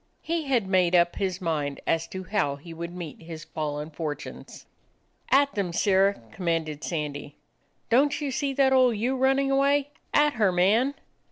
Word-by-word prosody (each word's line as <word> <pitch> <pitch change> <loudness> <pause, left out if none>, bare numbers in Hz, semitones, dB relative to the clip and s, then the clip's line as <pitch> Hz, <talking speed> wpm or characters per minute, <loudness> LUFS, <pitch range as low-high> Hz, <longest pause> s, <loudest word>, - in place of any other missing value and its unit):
He 330 -1 -2
had 250 -6 +1
made 185 -2 +2
up 175 0 +3
his 185 -2 -2
mind 150 -6 -2
as 165 0 0
to 190 0 -7
how 185 -8 0
he 165 +4 -11
would 170 +1 -6
meet 175 -4 -8
his 160 -1 -8
fallen 150 -1 -4
fortunes. 150 -1 -7 0.6
"At 280 +1 +4
them! 195 -4 -2
Sirrah!" 195 +2 +2
commanded 165 -4 -2
Sandy. 150 -3 -4 0.6
9 240 - +6
"Don't 290 +1 +1
you 290 -3 -2
see 275 +2 -1
that 265 -1 +3
old 255 -4 +4
ewe 245 +5 0
running 270 +1 +2
away? 280 +1 +2 0.2
At 295 0 +3
her, 210 -5 +2
man!" 215 +10 +2
190 Hz, 170 wpm, -26 LUFS, 165-265 Hz, 0.6 s, 9